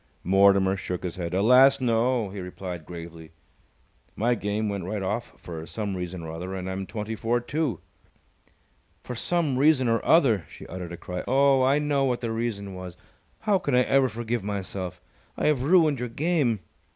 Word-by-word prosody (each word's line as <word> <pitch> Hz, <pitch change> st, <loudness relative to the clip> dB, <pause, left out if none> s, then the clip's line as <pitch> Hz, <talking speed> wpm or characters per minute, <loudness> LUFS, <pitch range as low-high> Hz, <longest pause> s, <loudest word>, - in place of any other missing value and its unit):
Mortimer 95 Hz, +1 st, +4 dB
shook 90 Hz, -2 st, -5 dB
his 90 Hz, 0 st, -4 dB
head. 85 Hz, 0 st, -3 dB
"Alas, 125 Hz, +7 st, +6 dB
no!" 120 Hz, -3 st, +1 dB
he 100 Hz, -, -7 dB
replied, 90 Hz, -2 st, -7 dB
gravely. 85 Hz, -1 st, -9 dB, 0.8 s
"My 120 Hz, +3 st, +2 dB
game 105 Hz, -1 st, -2 dB
went 100 Hz, -3 st, -3 dB
right 100 Hz, +1 st, -3 dB
off 105 Hz, +5 st, -3 dB
for 80 Hz, -2 st, -8 dB
some 100 Hz, +1 st, -3 dB
reason 90 Hz, -1 st, -5 dB
or 80 Hz, -, -6 dB
other, 90 Hz, +4 st, -5 dB
and 95 Hz, -1 st, -5 dB
I'm 95 Hz, 0 st, -4 dB
twenty 105 Hz, 0 st, -4 dB
four, 115 Hz, +2 st, 0 dB
too." 130 Hz, -, -2 dB, 1.2 s
"For 125 Hz, -, -6 dB
some 145 Hz, +2 st, 0 dB
reason 140 Hz, -3 st, +4 dB
or 115 Hz, 0 st, +1 dB
other!" 115 Hz, -, +4 dB
She -, -, -11 dB
uttered 90 Hz, -1 st, -7 dB
a -, -, -6 dB
cry. 90 Hz, +1 st, -5 dB
"Oh, 135 Hz, 0 st, +4 dB
I 135 Hz, +2 st, +4 dB
know 145 Hz, -2 st, +1 dB
what 125 Hz, -2 st, 0 dB
the 115 Hz, -2 st, -2 dB
reason 110 Hz, -4 st, -3 dB
was! 90 Hz, -2 st, -8 dB, 0.4 s
How 210 Hz, -3 st, +2 dB
can 145 Hz, -7 st, 0 dB
I 125 Hz, -, +5 dB
ever 135 Hz, 0 st, +3 dB
forgive 120 Hz, 0 st, -3 dB
myself! 95 Hz, -3 st, -5 dB, 0.3 s
I -, -, -1 dB
have 150 Hz, -4 st, +3 dB
ruined 155 Hz, -2 st, +4 dB
your 125 Hz, 0 st, -3 dB
game!" 135 Hz, -, 0 dB
110 Hz, 180 wpm, -26 LUFS, 95-130 Hz, 1.2 s, Alas